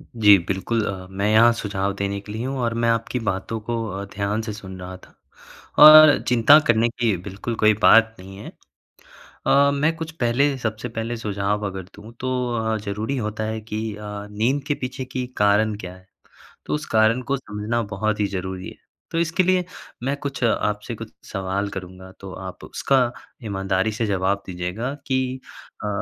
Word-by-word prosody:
जी, 105 Hz, -3 st, +7 dB
बिल्कुल 105 Hz, +4 st, -1 dB
अ, 95 Hz, -2 st, -5 dB
मैं 100 Hz, +2 st, -1 dB
यहाँ 115 Hz, +2 st, +6 dB
सुझाव 100 Hz, -3 st, -2 dB
देने 100 Hz, 0 st, -2 dB
के 105 Hz, -, -10 dB
लिए 110 Hz, +3 st, -4 dB
हूँ 135 Hz, +1 st, -3 dB
और 115 Hz, -1 st, 0 dB
मैं 115 Hz, 0 st, +1 dB
आपकी 115 Hz, +2 st, 0 dB
बातों 95 Hz, +4 st, -3 dB
को 115 Hz, -1 st, -1 dB
अ, 95 Hz, +1 st, -5 dB
ध्यान 100 Hz, +2 st, -1 dB
से 110 Hz, -1 st, -5 dB
सुन 95 Hz, -2 st, -9 dB
रहा 90 Hz, 0 st, -7 dB
था, -, -, -20 dB, 0.7 s
और 155 Hz, 0 st, +10 dB
चिंता 125 Hz, +5 st, +7 dB
करने 115 Hz, 0 st, +3 dB
की 115 Hz, -4 st, 0 dB
बिल्कुल 100 Hz, +4 st, -4 dB
कोई 110 Hz, 0 st, +6 dB
बात 115 Hz, 0 st, +6 dB
नहीं 95 Hz, +1 st, -11 dB
है। 105 Hz, -, -9 dB, 1.0 s
अ, 140 Hz, 0 st, +5 dB
मैं 150 Hz, +3 st, +1 dB
कुछ 165 Hz, -1 st, -5 dB
पहले 135 Hz, +4 st, +2 dB
सबसे 110 Hz, -1 st, -4 dB
पहले 115 Hz, +1 st, -4 dB
सुझाव 105 Hz, -1 st, -2 dB
अगर 95 Hz, -1 st, -6 dB
दूँ 110 Hz, +3 st, -12 dB
तो 130 Hz, -, -2 dB, 0.3 s
अ, 110 Hz, 0 st, 0 dB
ज़रूरी 110 Hz, +7 st, -3 dB
होता 110 Hz, -1 st, -3 dB
है 110 Hz, 0 st, -3 dB
कि 110 Hz, 0 st, -4 dB
अ, 105 Hz, -, -11 dB, 0.3 s
नींद 125 Hz, +7 st, 0 dB
के 145 Hz, -, +2 dB
पीछे 130 Hz, +1 st, -4 dB
की 130 Hz, 0 st, -4 dB
कारण 105 Hz, +1 st, +3 dB
क्या 90 Hz, -3 st, -8 dB
है। 95 Hz, 0 st, -19 dB, 0.6 s
तो -, -, -3 dB
उस 150 Hz, -, -4 dB
कारण 110 Hz, +3 st, +4 dB
को 140 Hz, -, +2 dB
समझना 110 Hz, 0 st, -3 dB
बहुत 110 Hz, +2 st, -1 dB
ही 105 Hz, -, +2 dB
ज़रूरी 95 Hz, -1 st, -5 dB
है। -, -, -14 dB, 0.3 s
तो 165 Hz, -, 0 dB
इसके 170 Hz, +2 st, +1 dB
लिए 185 Hz, -1 st, +2 dB, 0.4 s
मैं 135 Hz, +2 st, 0 dB
कुछ 140 Hz, -2 st, -5 dB
आपसे 105 Hz, 0 st, -1 dB
कुछ 115 Hz, 0 st, -9 dB, 0.2 s
सवाल 95 Hz, +1 st, -2 dB
करूँगा 95 Hz, -1 st, -9 dB
तो 95 Hz, -1 st, -9 dB
आप 95 Hz, -1 st, -8 dB
उसका 130 Hz, -3 st, +1 dB, 0.3 s
ईमानदारी 95 Hz, 0 st, 0 dB
से 115 Hz, +1 st, -1 dB
जवाब 100 Hz, 0 st, 0 dB
दीजिएगा 90 Hz, +8 st, -4 dB
कि 130 Hz, -1 st, -1 dB, 0.5 s
अ, -, -, -1 dB
110 Hz, 185 wpm, -22 LUFS, 100-120 Hz, 1.0 s, और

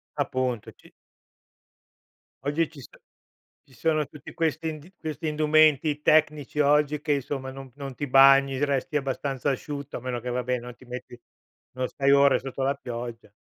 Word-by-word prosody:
Appunto, 125 Hz, -4 st, -2 dB
ci -, -, -21 dB, 1.5 s
Oggi 150 Hz, +3 st, 0 dB
ci 155 Hz, -3 st, -14 dB
so -, -, -12 dB, 0.8 s
ci 130 Hz, -, -21 dB
sono 155 Hz, +2 st, +1 dB
tutti 150 Hz, -, -12 dB
questi 160 Hz, -1 st, -1 dB
ind 155 Hz, +4 st, -9 dB
questi 155 Hz, 0 st, -5 dB
indumenti 155 Hz, -1 st, +3 dB
tecnici 150 Hz, -1 st, +2 dB
oggi 150 Hz, 0 st, +3 dB
che, 150 Hz, -, -1 dB
insomma, 135 Hz, -1 st, -3 dB
non 135 Hz, -1 st, -10 dB
non 140 Hz, -2 st, -7 dB
ti 145 Hz, +3 st, -4 dB
bagni, 135 Hz, +1 st, +6 dB
resti 140 Hz, +2 st, -1 dB
abbastanza 135 Hz, 0 st, -1 dB
asciutto, 140 Hz, +1 st, -5 dB
a -, -, -6 dB
meno 125 Hz, -1 st, -3 dB
che, 125 Hz, -, -5 dB
vabbè, 125 Hz, 0 st, -1 dB
non 120 Hz, 0 st, -8 dB
ti 130 Hz, -, -18 dB
metti 125 Hz, 0 st, -8 dB, 0.5 s
non 130 Hz, 0 st, -2 dB
stai 140 Hz, 0 st, +1 dB
ore 140 Hz, -1 st, +5 dB
sotto 135 Hz, 0 st, -5 dB
la 140 Hz, +1 st, +2 dB
pioggia. 120 Hz, -4 st, -7 dB
140 Hz, 160 wpm, -26 LUFS, 130-150 Hz, 1.5 s, bagni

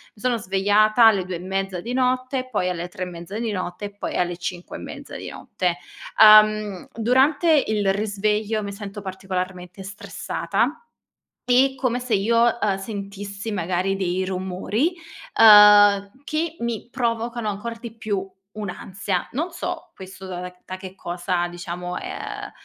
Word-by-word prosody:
sono 240 Hz, +2 st, 0 dB
svegliata 210 Hz, +4 st, +4 dB
alle 195 Hz, -4 st, +3 dB
2 185 Hz, 0 st, -4 dB
e 170 Hz, -, -5 dB
mezza 190 Hz, 0 st, -3 dB
di 235 Hz, -, -6 dB
notte, 255 Hz, 0 st, 0 dB
poi 185 Hz, -6 st, 0 dB
alle 175 Hz, 0 st, -3 dB
3 185 Hz, -1 st, -6 dB
e -, -, -2 dB
mezza 175 Hz, +3 st, -7 dB
di 230 Hz, -2 st, -2 dB
notte 185 Hz, 0 st, -4 dB
e 205 Hz, 0 st, -9 dB
poi -, -, -4 dB
alle 175 Hz, -1 st, 0 dB
5 175 Hz, 0 st, -6 dB
e -, -, -10 dB
mezza -, -, -9 dB
di -, -, -7 dB
notte. 180 Hz, -2 st, -2 dB, 0.4 s
Uhm, 215 Hz, -2 st, +6 dB
durante 275 Hz, +7 st, +3 dB
il 205 Hz, -3 st, +1 dB
risveglio 210 Hz, +1 st, -1 dB
mi 200 Hz, -, -4 dB
sento 200 Hz, 0 st, -7 dB
particolarmente 185 Hz, -1 st, -5 dB
stressata, 195 Hz, +1 st, -2 dB, 0.7 s
e 260 Hz, +2 st, +4 dB
come 250 Hz, -1 st, -1 dB
se 250 Hz, -3 st, -1 dB
io, 230 Hz, +4 st, +3 dB
uhm, 200 Hz, -2 st, +1 dB
sentissi 200 Hz, +1 st, -6 dB
magari 185 Hz, +1 st, -1 dB
dei 185 Hz, -1 st, -1 dB
rumori, 190 Hz, -, -1 dB, 0.5 s
uhm, 205 Hz, -2 st, +8 dB
che 315 Hz, +2 st, -2 dB
mi 235 Hz, -1 st, -4 dB
provocano 235 Hz, -2 st, -2 dB
ancor 230 Hz, +3 st, -4 dB
di 230 Hz, -1 st, -9 dB
più 200 Hz, -3 st, -3 dB, 0.3 s
un'ansia. 190 Hz, -2 st, -3 dB
Non 320 Hz, +8 st, -2 dB
so -, -, -5 dB
questo 190 Hz, 0 st, -10 dB
da 180 Hz, -1 st, -5 dB
da 180 Hz, 0 st, -7 dB
da 185 Hz, -, -6 dB
che 190 Hz, -1 st, -9 dB
cosa 175 Hz, -1 st, -2 dB
diciamo 175 Hz, +1 st, -6 dB
è -, -, -7 dB
uhm, -, -, -6 dB
200 Hz, 155 wpm, -23 LUFS, 185-225 Hz, 0.7 s, uhm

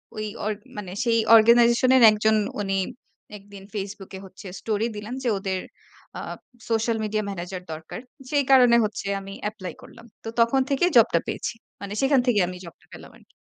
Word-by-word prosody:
ঐ -, -, -6 dB, 0.2 s
ওর 215 Hz, +1 st, 0 dB, 0.2 s
মানে 190 Hz, -3 st, -6 dB
সেই 230 Hz, -2 st, +2 dB, 0.2 s
organization 235 Hz, +2 st, +5 dB
এর 255 Hz, -, +5 dB
একজন 215 Hz, +1 st, +2 dB, 0.2 s
উনি 195 Hz, -1 st, -1 dB, 0.6 s
একদিন 200 Hz, -1 st, -14 dB
Facebook 200 Hz, -1 st, -6 dB
এ -, -, -9 dB
হচ্ছে 190 Hz, +1 st, -12 dB
স্টোরি 215 Hz, +1 st, -1 dB
দিলেন 210 Hz, +3 st, -7 dB
যে 245 Hz, -, +1 dB
ওদের 190 Hz, -1 st, -3 dB, 0.6 s
আ -, -, -5 dB, 0.5 s
সোশ্যাল 225 Hz, 0 st, +1 dB
মিডিয়া 215 Hz, 0 st, -1 dB
ম্যানেজার 180 Hz, -1 st, -6 dB
দরকার। 160 Hz, +1 st, -8 dB, 0.3 s
সেই 290 Hz, -1 st, +2 dB
কারণে 250 Hz, -3 st, +7 dB
হচ্ছে 210 Hz, -1 st, -4 dB
আমি 195 Hz, 0 st, -9 dB, 0.2 s
এপ্লাই 195 Hz, -4 st, -8 dB
করলাম। 250 Hz, -1 st, -15 dB, 0.2 s
তো 225 Hz, -, -5 dB
তখন 235 Hz, +3 st, +3 dB
থেকে 280 Hz, +5 st, +2 dB
জবটা 220 Hz, -7 st, +5 dB
পেয়েছি। -, -, -3 dB, 0.3 s
মানে 200 Hz, 0 st, -6 dB
সেখান 270 Hz, 0 st, +3 dB
থেকেই 220 Hz, -7 st, +3 dB
আমি 180 Hz, 0 st, -7 dB
জবটা 170 Hz, -, -14 dB
পেলাম -, -, -12 dB
আরকি। -, -, -25 dB
215 Hz, 175 wpm, -24 LUFS, 195-235 Hz, 0.6 s, কারণে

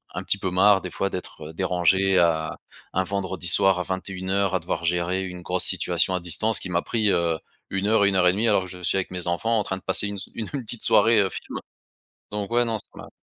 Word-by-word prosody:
un -, -, -4 dB
petit -, -, +3 dB
peu 95 Hz, -, -2 dB
marre 95 Hz, +2 st, +4 dB
des 90 Hz, -, -6 dB
fois 100 Hz, -, -2 dB
d'être 80 Hz, -4 st, -8 dB
dérangé 95 Hz, +2 st, +1 dB
à 80 Hz, -2 st, +1 dB, 0.4 s
un 95 Hz, -, +1 dB
vendredi 95 Hz, -2 st, -3 dB
soir 95 Hz, 0 st, +4 dB
à -, -, -1 dB
21:00 95 Hz, +1 st, -2 dB
à -, -, +1 dB
devoir 85 Hz, 0 st, -4 dB
gérer 90 Hz, +2 st, -1 dB
une 90 Hz, -1 st, -8 dB
grosse 90 Hz, 0 st, +1 dB
situation 95 Hz, -, +3 dB
à -, -, -1 dB
distance 90 Hz, +6 st, +3 dB
qui -, -, -7 dB
m'a 85 Hz, 0 st, +1 dB
pris, 110 Hz, -3 st, -1 dB
heu, 85 Hz, -2 st, 0 dB, 0.3 s
1:00-1:30 100 Hz, 0 st, +2 dB
alors 100 Hz, -3 st, +2 dB
que 90 Hz, -, -9 dB
je 90 Hz, 0 st, -9 dB
suis 95 Hz, -, 0 dB
avec 95 Hz, -, -3 dB
mes 90 Hz, -1 st, -3 dB
enfants 110 Hz, +7 st, 0 dB
en -, -, -1 dB
train 95 Hz, -, -4 dB
de 95 Hz, -, -14 dB
passer 105 Hz, -, 0 dB
une 100 Hz, -, -5 dB
s 95 Hz, -, -7 dB
une 110 Hz, -, -5 dB
une 140 Hz, -3 st, -4 dB
petite 115 Hz, +1 st, -2 dB
soirée, 115 Hz, -1 st, +4 dB
heu, 95 Hz, -, 0 dB
film -, -, -7 dB, 0.7 s
donc 105 Hz, 0 st, -4 dB
ouais 120 Hz, +1 st, +3 dB
non 115 Hz, -1 st, -2 dB
ça -, -, -5 dB
m'a -, -, -11 dB
95 Hz, 230 wpm, -23 LUFS, 90-100 Hz, 0.7 s, marre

